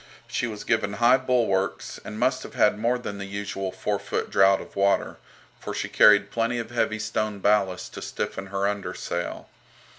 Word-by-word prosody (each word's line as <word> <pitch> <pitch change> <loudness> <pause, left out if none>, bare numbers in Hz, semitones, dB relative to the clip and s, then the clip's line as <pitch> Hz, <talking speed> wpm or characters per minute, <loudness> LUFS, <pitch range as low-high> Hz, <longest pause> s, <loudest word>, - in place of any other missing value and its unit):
She 125 - -1
was 105 -2 -6
given 110 -3 0
high 120 +4 +5
bulwarks, 120 -7 0
and 105 - -7
must 130 +1 +1
have - - -10
had 105 0 +3
more 120 +3 +1
than 105 -5 -6
the 100 - -4
usual 100 -1 -4
four 100 +2 -2
foot - - -3
draught 95 0 +5
of - - -11
water, 100 0 +1 0.4
for - - -6
she - - -3
carried 100 -1 +6
plenty 115 +1 0
of 115 0 -5
heavy 110 -2 0
stone 110 -1 -2
ballast 100 -2 +1
to - - -7
stiffen 95 0 -4
her 100 0 -1
under 100 -1 -3
sail. 85 0 -4
105 Hz, 185 wpm, -25 LUFS, 100-115 Hz, 0.4 s, carried